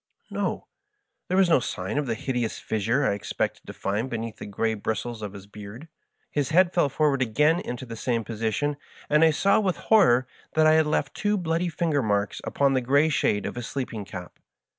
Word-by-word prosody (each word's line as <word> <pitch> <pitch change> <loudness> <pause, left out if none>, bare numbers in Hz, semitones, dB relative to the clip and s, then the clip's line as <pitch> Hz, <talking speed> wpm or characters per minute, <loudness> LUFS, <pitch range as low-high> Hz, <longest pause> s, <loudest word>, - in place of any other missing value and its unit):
No; - - -2 0.6
there 185 - 0
was 190 -1 +5
no 165 - +5
sign 95 +2 -3
of 145 - -2
the 115 - 0
hideous 120 -1 -2
fissure 115 +6 0
I - - +2
expected 100 - -3
to - - -7
find 105 +6 -2
beneath 115 -2 -4
the - - -8
gray 110 +2 -1
bristles 110 +2 -3
of 105 -2 -5
his 100 -1 -10
beard. 105 +8 -10 0.4
His 145 -3 0
head 175 +2 +4
fell 170 -5 +3
forward 140 -1 +1
again 150 +8 +3
into 125 -6 -5
the 115 -2 -7
same 115 0 -1
position, 115 +7 -2 0.3
and 150 +2 +5
I 160 - +7
saw 195 +7 +3
with 190 -4 0
horror 150 - +4 0.3
that 155 0 +5
I 155 - +6
had 160 -1 +4
left 150 -1 0
two 210 0 0
bloody 170 0 0
finger 155 -2 0
marks 100 -3 -1
upon 140 -1 +1
the 130 - +2
grey 140 +5 +3
shade 105 -9 +1
of - - -3
his 120 -1 -5
sleeping 125 -6 -4
cap. 90 -2 -9
130 Hz, 205 wpm, -26 LUFS, 110-155 Hz, 0.6 s, I